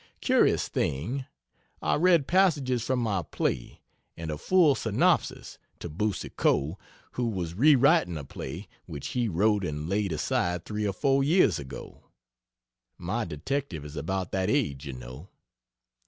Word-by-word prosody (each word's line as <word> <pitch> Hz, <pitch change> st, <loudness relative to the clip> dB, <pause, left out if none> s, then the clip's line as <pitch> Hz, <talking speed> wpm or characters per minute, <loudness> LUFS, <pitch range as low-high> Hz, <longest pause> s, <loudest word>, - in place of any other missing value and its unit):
Curious -, -, +3 dB
thing. 120 Hz, -, -2 dB, 0.5 s
I -, -, 0 dB
read 170 Hz, -3 st, +4 dB
passages 145 Hz, -, +2 dB
from 130 Hz, +1 st, 0 dB
my 110 Hz, -6 st, 0 dB
play, 65 Hz, -5 st, -3 dB, 0.4 s
and 80 Hz, -1 st, -4 dB
a 75 Hz, -, -4 dB
full 180 Hz, -6 st, +4 dB
synopsis, 110 Hz, -5 st, 0 dB, 0.2 s
to 85 Hz, -, -7 dB
Boucicault, 90 Hz, -3 st, -1 dB, 0.3 s
who 125 Hz, -1 st, -2 dB
was 90 Hz, -6 st, -3 dB
re 145 Hz, -, +5 dB
writing 135 Hz, -, +3 dB
a 75 Hz, -, -6 dB
play, 80 Hz, +8 st, -7 dB, 0.2 s
which 75 Hz, -6 st, -6 dB
he 120 Hz, -2 st, 0 dB
wrote 105 Hz, +2 st, +2 dB
and 75 Hz, -2 st, -3 dB
laid 100 Hz, +1 st, 0 dB
aside 85 Hz, +3 st, -1 dB
3 105 Hz, 0 st, -2 dB
or 100 Hz, -, -1 dB
4 135 Hz, +6 st, +2 dB
years 145 Hz, -, +3 dB
ago. 65 Hz, -2 st, -10 dB, 0.9 s
(My 105 Hz, +7 st, -2 dB
detective 85 Hz, -, -4 dB
is 75 Hz, +1 st, -9 dB
about 90 Hz, +5 st, -3 dB
that 95 Hz, -1 st, 0 dB
age, 75 Hz, -, 0 dB
you 70 Hz, -, -5 dB
know.) 65 Hz, +7 st, -10 dB
100 Hz, 145 wpm, -27 LUFS, 80-130 Hz, 0.9 s, re